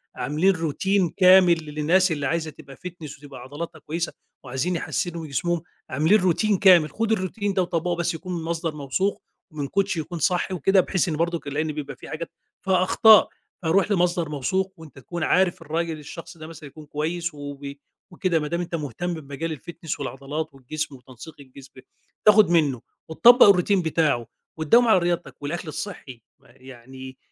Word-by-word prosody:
عاملين 175 +7 +1
routine 180 +3 0
كامل 180 -3 +6
للناس 160 +5 +2
اللي 145 -3 -2
عايزة 160 +1 -2
تبقى 135 -1 -14
fitness 170 -4 -9
وتبقى 140 -3 -11
عضلاتها 145 +7 -7
كويسة، 165 +2 -4 0.3
وعايزين 135 +7 -2
يحسّنوا 170 0 -3
من - - -7
جسمهم 175 +4 -1 0.3
عاملين 160 +11 +3
routine 190 +3 +2
كامل 180 -6 +6
خُد 225 0 0
الroutine 200 0 -2
ده 190 - +1
وطبّقه 175 0 -1
بس 170 0 -1
يكون 180 +2 -5
المصدر 165 -1 -3
موثوق، 150 +8 -2 0.3
ومن 145 -3 -4
coach 195 +1 0
يكون 165 +2 -5
صح 180 +4 0
وكده 185 +2 +3
بحيث 185 0 -1
إن 155 - -1
برضك، 170 -1 -2
لإن 155 +2 -2
بيبقى 145 -1 -6
في - - -12
حاجات 165 +1 -6 0.3
فيها 185 -1 +3
أخطاء، 215 +2 +6 0.3
فرُوح 190 +5 +2
لمصدر 175 -3 +1
موثوق 185 +7 -1
وأنت 160 -2 -14
تكون 170 +6 -5
عارف 180 +1 +2
الراجل 165 0 -3
الشخص 165 +3 -10
ده 155 -1 -9
مثلًا 160 -2 -11
يكون 155 +2 -13
كويس 165 +3 -3
وبي 145 -1 -8 0.3
وكده 180 -2 0
بادام 160 +3 -2
أنت 175 -1 -4
مهتم 155 +3 -4
بمجال 155 +1 -5
الfitness 165 0 -7
والعضلات 145 +3 -5
والجسم 140 +2 -5
وتنسيق 130 +3 -13
الجسم، 135 0 -14 0.5
تاخد 210 -3 +7
منُّه 150 -8 +2 0.3
وتطبّق 235 +6 +7
الroutine 190 +1 +1
بتاعُه 150 -7 +1 0.3
وتداوم 230 +11 +4
على 215 -5 +5
رياضتك 175 -3 -3
والأكل 160 +3 -4
الصحّي، 145 - -7 0.2
م - - -30
يعني 130 +1 -12
165 Hz, 165 wpm, -24 LUFS, 145-180 Hz, 0.5 s, تاخد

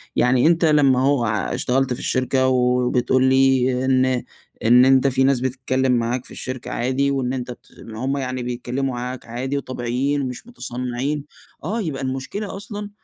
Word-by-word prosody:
يعني 125 +3 +3
أنت 170 0 +3
لمّا 145 -5 +4
أهو 135 -2 +2
اشتغلت 125 +4 0
في 125 - -6
الشركة، 130 0 +1
وبتقول 125 0 +2
لي، 130 -1 +3
إن 130 -1 +2 0.4
إن 125 +3 +7
أنت 135 0 +4
في 130 0 +2
ناس 135 -1 +3
بتتكلّم 130 +1 0
معاك 120 +1 0
في - - -9
الشركة 130 -1 -6
عادي، 130 +3 0
وإن 130 -2 -1
أنت 125 -1 -4
بت 120 - -13
ما 110 -1 -9
هم 135 +1 0
يعني 130 -2 -3
بيتكلّموا 125 +2 -3
معاك 125 +1 -5
عادي 130 +4 -3
وطبيعيين، 130 +2 -2
ومش 130 - -6
مُتصنّعين، 130 - -4 0.4
آه، 215 +9 -2
يبقى 155 -8 -4
المشكلة 135 +12 -4
أصلًا 205 +1 -6
130 Hz, 160 wpm, -21 LUFS, 125-135 Hz, 0.4 s, إن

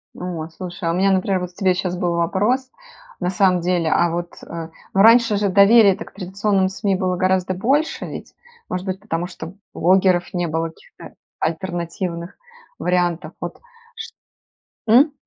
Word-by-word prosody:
О, 175 -3 -5
слушай, 175 +1 -8
а - - +2
у - - -1
меня, 195 +2 +3
например, 190 0 +1
вот 180 -1 -5
к - - -32
тебе 190 -2 +2
щас 180 -1 -3
был 175 -1 0
вопрос, 210 +10 0 0.5
на 180 - -1
самом 185 -2 +2
деле, 175 -2 0
а 175 - +3
вот, 175 0 -4
э, 165 -1 -7 0.2
ну, 195 - +4
раньше 230 -1 +6
же 200 -1 +1
доверия-то 200 0 +5
к - - -16
традиционным 195 0 0
СМИ 195 0 -1
было 185 0 -1
гораздо 185 0 +1
больше, 275 - 0
ведь? - - -8 0.4
Может 185 +1 -3
быть, 190 0 -3
потому 175 -4 -3
что 165 -1 -9 0.2
блогеров 185 +1 +2
не 175 -1 -1
было, 165 +1 -2
каких-то 160 - -15 0.2
альтернативных 170 +1 -4 0.4
вариантов. 180 -1 0
Вот - - -6 0.4
чт - - -8 0.8
м? 270 +7 +6
185 Hz, 165 wpm, -21 LUFS, 175-195 Hz, 0.8 s, раньше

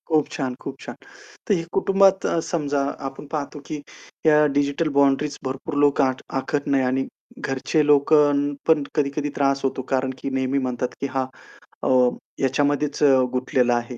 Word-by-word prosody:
खूप 155 -3 +2
छान, 130 -4 -3
खूप 135 0 -7
छान. - - -8 0.5
तर 210 - +3
हे 170 -4 0
कुटुंबात 195 0 +3
अ, 170 - +1
समजा 145 -4 -1 0.3
आपण 135 +2 -12
पाहतो 150 -1 -4
की 155 - -3 0.5
ह्या 150 -1 +6
डिजिटल 145 +3 +1
बाउंडरीज 140 +1 +2
भरपूर 135 +3 -4
लोक 145 0 +2
आख 130 -1 0 0.2
आखत 145 +1 -3
नाही 135 -1 +2
आणि 130 +1 0 0.3
घरचे 140 +3 0
लोकं 145 0 +4
पण 160 -3 +4
कधी-कधी 145 0 0
त्रास 140 -1 +1
होतो. 135 0 -1
कारण 130 0 -1
की - - -4
नेहमी 130 0 -1
म्हणतात, 125 0 -2
की 140 - 0
"हा 130 -1 +1 0.6
अ, - - +1 0.5
ह्याच्यामध्येच 145 +2 0 0.3
गुतलेला 125 -1 +1
आहे." 120 +1 -4
140 Hz, 160 wpm, -23 LUFS, 135-150 Hz, 0.6 s, ह्या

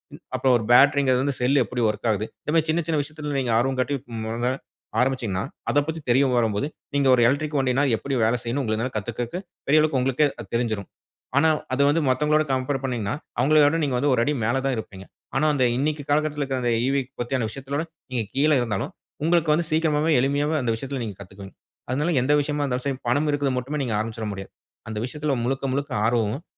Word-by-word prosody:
ம் - - -15 0.2
அப்ப - - -9
ஒரு 110 - -5
பேட்டரிங்குறதுலருந்து 135 0 +4
செல் 135 +2 +3
எப்படி 120 +3 -2
வொர்க் 105 +2 -2
ஆகுது, 105 +1 -1 0.2
இந்த - - -2
மாதிரி 160 -1 +2
சின்ன, 170 0 0
சின்ன 155 -2 +2
விஷயத்துல 150 -1 -5
நீங்க 120 -3 0
ஆர்வம் 130 +1 0
காட்டி, 140 +3 -1 0.3
மொத 120 +3 -1 0.5
ஆரம்பிச்சீங்கன்னா 120 -8 0 0.3
அதப்பத்தி 155 +3 0
தெரிய 130 +3 +5
வரும்போது 110 +3 +1 0.3
நீங்க 140 -1 +2
ஒரு 120 - +2
எலக்ட்ரிக் 145 +3 0
வண்டினா 130 +2 +2
எப்படி 135 +4 -3
வேலை 115 +2 +2
செய்யும்னு 125 +4 -1
உங்களால 110 +2 -1
கத்துக்குறதுக்கு 120 - -4 0.3
பெரிய 155 +2 +5
அளவுக்கு 150 -4 +1
உங்களுக்கே 135 +3 +2
அது - - -7
தெரிஞ்சுரும். 110 -5 -1 0.5
ஆனா, 160 +2 +5 0.2
அது 135 - +1
வந்து 160 +3 +3
மத்தவங்களோட 150 +4 +3
கம்பேர் 135 +1 0
பண்ணீங்கன்னா, 120 -6 -2 0.3
அவங்களைவிட 150 +3 +4
நீங்க 135 -3 0
வந்து 140 +3 +1
ஒரு 125 - +2
அடி 150 - +1
மேல 115 +4 +1
தான் 135 - +1
இருப்பீங்க. 95 -3 -8 0.3
ஆனா, 150 +3 +2
அந்த 135 -3 +1
இன்னைக்கு 150 +3 -1
காலகட்டத்துல 150 0 +1
இருக்கிற 135 -1 -2
அந்த 120 -1 +1
ஈ. - - +1
வீ 140 - +3 0.2
பத்துன 120 -1 -1
விஷயத்துலகூட, 140 +5 -4 0.3
நீங்க 120 -3 -1
கீழ 145 +3 +3
இருந்தாலும் 110 -5 -2 0.3
உங்களுக்கு 165 -1 +3
வந்து 165 +2 +1
சீக்கிரமாகவே, 155 0 +2
எளிமையாகவே 145 +4 +1
அந்த 120 -2 0
விஷயத்துல 135 +3 -5
நீங்க 105 -4 -5
கத்துக்குவீங்க. 95 0 -11 0.4
அதனால 150 +7 0
எந்த 145 +4 +2
விஷயமா 145 0 -2
இருந்தாலும் 125 -2 -2
சரி, 135 -2 -1
பணம் 145 +5 +2
இருக்குதுன்னு 140 -3 0
மட்டுமே 145 +4 -4
நீங்க 120 -4 -2
ஆரம்பிச்சுற 110 0 -4
முடியாது. 95 -1 -7 0.4
அந்த 110 - -5
விஷயத்துல 150 +1 -2
முழுக்க 135 +2 -1
முழுக்க 140 +1 -2
ஆர்வமும், 115 +5 0
135 Hz, 195 wpm, -24 LUFS, 120-145 Hz, 0.5 s, தெரிய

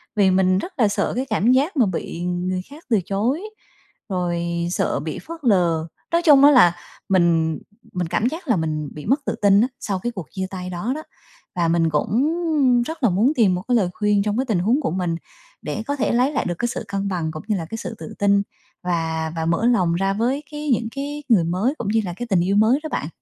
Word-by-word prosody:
vì 200 -3 +4
mình 185 0 +3
rất 365 - -4
là 220 - +5
sợ 200 - -1
cái 255 +2 -1
cảm 220 +2 +2
giác 285 +6 +2
mà 250 - +5
bị 175 -2 -4
người 180 +1 -2
khác 300 +4 -13
từ 225 -4 +3
chối, 220 - 0 0.7
rồi 175 -2 -1 0.3
sợ 180 - 0
bị 155 +2 -5
phớt 335 0 -9
lờ. 175 -8 +2 0.2
Nói 335 0 +3
chung 285 -4 +7
á 290 - +9
là 175 - +6 0.3
mình 165 -4 +2 0.3
mình 180 -2 -2
cảm 215 +7 0
giác 320 +6 -8
là 240 - +3
mình 155 -3 -2
bị 150 - -9
mất 275 +6 +1
tự - - -1
tin 200 0 +5
á 240 - +3
sau 195 -3 -2
cái 240 +6 -3
cuộc 185 -8 -7
chia 190 -1 -3
tay 180 -1 -6
đó 180 +7 -3
đó. 310 - -6 0.5
Và 170 -2 +1
mình 165 0 +2
cũng 230 - +1 0.5
rất 320 0 -7
là 240 - +5
muốn 215 - +2
tìm 205 -8 +3
một 180 - -3
cái 250 - +2
lời 195 -6 +2
khuyên 210 -1 +1
trong 210 +1 -1
cái 260 - 0
tình 215 -8 0
huống 230 - +2
của 265 - -1
mình 180 -2 -1 0.5
để 150 +8 -4
có 285 - 0
thể 275 - 0
lấy 250 +4 +2
lại 280 - -1
được 175 - -1
cái 240 - +1
sự 235 - -4
cân 200 0 -2
bằng 170 -5 -2
cũng 155 -1 -8
như 215 - +1
là 165 - -4
cái 225 +8 -6
sự 225 - -6
tự 220 - -8
tin 200 0 +4 0.4
và 160 -2 -1
và 160 -1 -2
mở 170 +7 +1
lòng 185 -9 +3
ra 195 +2 0
với 250 +8 -1
cái 295 0 -5
những 235 -3 +1
cái 290 +2 -4
người 210 -8 +5
mới 185 - 0
cũng 235 - -4
như 220 +2 +2
là 175 - -4
cái 240 +5 -5
tình 190 -4 +3
yêu 190 +3 +1
mới 220 +6 +4
đó 315 - -4
bạn. 150 - -3
200 Hz, 245 wpm, -22 LUFS, 175-245 Hz, 0.7 s, á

